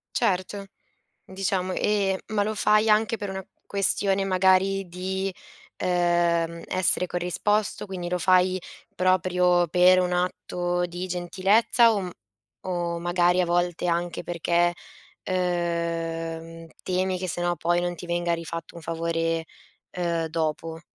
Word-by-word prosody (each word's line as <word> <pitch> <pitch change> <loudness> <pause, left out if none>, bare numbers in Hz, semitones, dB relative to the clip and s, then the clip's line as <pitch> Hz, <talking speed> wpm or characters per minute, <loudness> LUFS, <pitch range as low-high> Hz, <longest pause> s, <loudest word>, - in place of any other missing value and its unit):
Certo, 195 -2 0 0.6
diciamo 190 -1 -2
ehm, 195 -1 +1
ma 210 -1 0
lo 215 +1 -2
fai 215 +1 +3
anche 220 +1 +3
per 205 -2 -5
una 190 0 -5 0.2
questione 195 0 +2
magari 190 +1 +2
di, 190 +2 -3 0.5
uhm, 175 -2 +1
essere 185 0 +2
corrisposto, 195 +5 -1
quindi 180 -2 -5
lo 180 0 -1
fai 185 +1 +3 0.3
proprio 180 -1 +2
per 180 +2 +5
un 180 0 0
atto 175 0 -1
di 175 +1 -5
gentilezza 195 +6 +3
o 205 - 0
m 180 -2 -5 0.5
o 175 -2 -2
magari 175 +1 +2
a 180 - +1
volte 175 0 0
anche 170 0 -1
perché, 175 0 +1 0.5
uhm, 165 -2 -2 0.2
temi 185 0 -1
che 185 - -3
se 175 0 -4
no 175 0 0
poi 175 +3 +1
non 175 0 -2
ti 175 - -9
venga 175 0 0
rifatto 165 0 -6
un 170 - -10
favore, 165 0 -1 0.5
uhm, 170 -2 -1
dopo. 160 0 -3
180 Hz, 130 wpm, -25 LUFS, 170-190 Hz, 0.6 s, per